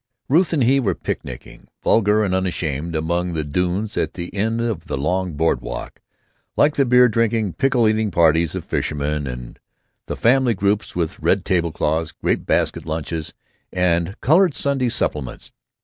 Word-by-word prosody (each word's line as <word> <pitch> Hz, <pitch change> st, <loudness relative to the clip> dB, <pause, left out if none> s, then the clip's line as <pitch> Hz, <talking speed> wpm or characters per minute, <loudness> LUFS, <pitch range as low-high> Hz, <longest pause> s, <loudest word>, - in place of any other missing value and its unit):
Ruth 165 Hz, +6 st, +3 dB
and 150 Hz, -6 st, +2 dB
he 135 Hz, +4 st, +4 dB
were 100 Hz, -9 st, 0 dB
picnicking, 60 Hz, -, -7 dB, 0.2 s
vulgar 105 Hz, 0 st, +3 dB
and 95 Hz, -3 st, 0 dB
unashamed, 85 Hz, -4 st, -2 dB
among 85 Hz, +3 st, -1 dB
the 80 Hz, -1 st, -1 dB
dunes 90 Hz, +8 st, -1 dB
at -, -, -1 dB
the 85 Hz, -1 st, -6 dB
end 110 Hz, +3 st, 0 dB
of 115 Hz, -8 st, -2 dB
the -, -, -3 dB
long 90 Hz, +5 st, -1 dB
board 75 Hz, -4 st, +1 dB
walk, -, -, -7 dB, 0.6 s
like 145 Hz, +1 st, +4 dB
the 140 Hz, -, +3 dB
beer 125 Hz, 0 st, +6 dB
drinking, 115 Hz, -3 st, 0 dB
pickle 130 Hz, -4 st, +2 dB
eating 110 Hz, 0 st, +1 dB
parties 85 Hz, -2 st, +3 dB
of -, -, -5 dB
fishermen 75 Hz, -1 st, -2 dB
and 60 Hz, -1 st, -7 dB, 0.5 s
the -, -, -3 dB
family 125 Hz, -1 st, +3 dB
groups 100 Hz, +2 st, -1 dB
with 90 Hz, +2 st, -2 dB
red 95 Hz, -1 st, +1 dB
table 85 Hz, -3 st, +1 dB
cloths, 80 Hz, +1 st, -1 dB
grape -, -, -2 dB
basket -, -, 0 dB
lunches, 80 Hz, 0 st, -4 dB, 0.4 s
and 90 Hz, +2 st, 0 dB
colored 170 Hz, +2 st, +4 dB
Sunday 135 Hz, -3 st, 0 dB
supplements. 75 Hz, -, -3 dB
95 Hz, 165 wpm, -21 LUFS, 80-115 Hz, 0.6 s, beer